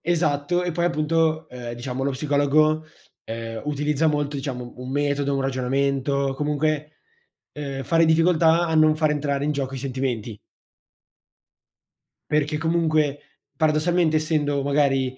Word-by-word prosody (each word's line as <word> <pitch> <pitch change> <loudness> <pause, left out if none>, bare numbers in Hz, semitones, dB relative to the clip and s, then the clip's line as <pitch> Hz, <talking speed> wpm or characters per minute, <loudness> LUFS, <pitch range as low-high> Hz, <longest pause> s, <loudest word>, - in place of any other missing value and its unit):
Esatto, 170 0 +1
e 175 - -1
poi 170 +1 0
appunto, 160 -1 +1
ehm, 120 -3 -7
diciamo, 125 +2 -5
lo 140 - +1
psicologo, 150 +3 +2 0.4
ehm, 115 0 -6
utilizza 150 +1 0
molto, 145 -1 0
diciamo, 125 -3 -5
un 125 +1 -7
metodo, 140 0 0
un 135 - 0
ragionamento, 135 +1 0
comunque, 150 +1 -2 0.5
ehm, 140 -2 -5
fa 165 - 0
difficoltà 165 +1 +4
a 160 - -2
non 155 0 +5
far 155 -1 +2
entrare 145 -1 -1
in 150 - +1
gioco 135 -2 -3
i - - -4
sentimenti. 125 -5 -3 1.9
Perché 150 0 +1
comunque 155 -3 +1 0.4
paradossalmente, 160 +1 +2
essendo 150 -3 0
magari 135 -2 +1
145 Hz, 130 wpm, -23 LUFS, 135-155 Hz, 1.9 s, non